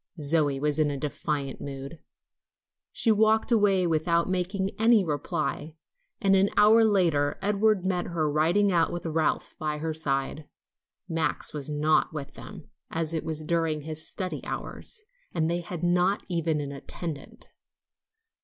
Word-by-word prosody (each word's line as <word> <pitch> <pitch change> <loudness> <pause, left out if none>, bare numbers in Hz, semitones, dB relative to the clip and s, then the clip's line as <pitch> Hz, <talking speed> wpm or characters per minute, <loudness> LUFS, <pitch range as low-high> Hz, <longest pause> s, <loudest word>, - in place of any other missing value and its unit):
Zoe 145 -2 +2
was 150 +1 0
in 150 -1 +3
a 140 - -3
defiant 145 -1 -3
mood. 140 +2 -7 0.9
She 230 - +2
walked 220 +2 +3
away 200 -5 +4
without 170 +1 +1
making 190 +1 -1
any 225 -3 +5
reply, 150 +1 -3 0.4
and 195 -1 +3
an 195 +1 +4
hour 215 +2 +7
later 170 -9 +2
Edward 205 -1 +2
met 180 -2 0
her 165 -3 -1
riding 165 +7 +2
out 170 -2 +2
with 175 0 -5
Ralph 160 -1 -1
by 150 -1 -2
her 160 +1 -3
side. 145 -1 -2 0.6
Max 165 -2 -1
was 150 -1 -5
not 150 +2 +2
with 145 -3 -6
them, - - -11 0.2
as 165 0 -1
it 160 - -1
was 155 -1 -4
during 165 -1 0
his 155 +1 -4
study 185 -2 -3
hours, 440 -3 -6 0.3
and 160 -2 +1
they 175 - 0
had 175 -1 -7
not 180 +3 +2
even 165 -3 0
an 140 -1 -5
attendant. 145 +2 -7
165 Hz, 150 wpm, -27 LUFS, 150-190 Hz, 0.9 s, hour